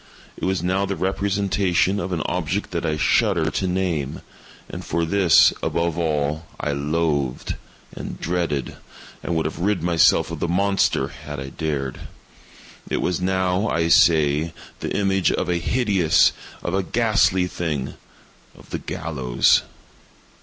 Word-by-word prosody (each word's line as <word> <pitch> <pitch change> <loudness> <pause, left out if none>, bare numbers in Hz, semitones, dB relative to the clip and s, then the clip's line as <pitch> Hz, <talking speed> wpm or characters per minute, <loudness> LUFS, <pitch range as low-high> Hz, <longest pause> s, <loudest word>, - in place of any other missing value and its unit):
It - - -5
was 95 -2 0
now 95 +2 0
the 100 - -2
representation 95 0 0
of 95 -1 -4
an 80 -4 -1
object 90 +4 -2
that 85 -1 -2
I 75 -1 0
shudder 85 -2 +2
to 95 - -1
name—and 90 -7 -5
for 85 +1 -1
this, 90 -1 +5
above 85 -1 -1
all, 80 -1 -1
I 75 - -1
loathed, 70 -2 -1 0.4
and - - -7
dreaded, 85 -6 -2 0.4
and 85 - -3
would 80 - 0
have - - -4
rid 95 -1 0
myself 85 -2 +3
of - - -5
the - - -1
monster 95 -6 +1
had 75 -1 -8
I 70 0 -6
dared—it 70 -4 -3 1.0
was 90 -1 -1
now, 95 +2 +1
I 85 0 0
say, 80 -1 +4 0.3
the - - -4
image 95 -2 +2
of 90 - -2
a 90 - +1
hideous—of 95 -5 +1
a 95 - +2
ghastly 105 -2 +2
thing—of 75 -7 -7
the - - -3
GALLOWS! 65 -6 +1
85 Hz, 135 wpm, -22 LUFS, 75-95 Hz, 1.0 s, this